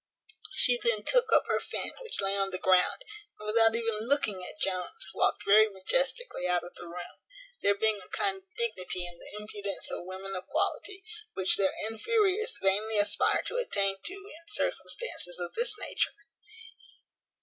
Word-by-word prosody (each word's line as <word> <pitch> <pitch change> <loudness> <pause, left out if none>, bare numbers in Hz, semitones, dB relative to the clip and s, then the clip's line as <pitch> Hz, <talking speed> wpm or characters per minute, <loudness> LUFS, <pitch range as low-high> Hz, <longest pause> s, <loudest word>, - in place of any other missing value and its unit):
She 245 -4 +3
then 220 -3 +1
took - - +2
up - - +5
her - - +1
fan - - -4
which 465 - -5
lay 195 0 +1
on 195 -1 +1
the 185 - -2
ground, 185 - +3 0.4
and 210 - -9
without 225 +1 +4
even 225 -1 -1
looking 220 -9 +1
at 205 - -5
Jones 185 -3 0
walked - - +1
very 215 +2 +7
majestically 465 - 0
out 180 -1 +1
of 175 - -10
the 175 - -10
room; 175 +1 -8 0.4
there 200 - +3
being 215 0 +1
a - - -14
kind 390 -1 0
of 385 +1 -21
dignity 185 - -1
in 175 -1 -9
the - - -10
impudence 205 -2 -4
of - - -5
women 190 +1 -6
of 185 - -6
quality, 390 -1 -1 0.3
which 190 -1 +3
their 195 -1 +2
inferiors 425 - +1
vainly 210 +3 +2
aspire 205 0 +3
to - - -2
attain 195 - +1
to 370 - -2
in 360 -5 -12
circumstances 420 - -1
of 175 - -3
this 475 +2 +2
nature. - - -1
210 Hz, 170 wpm, -30 LUFS, -, 0.4 s, very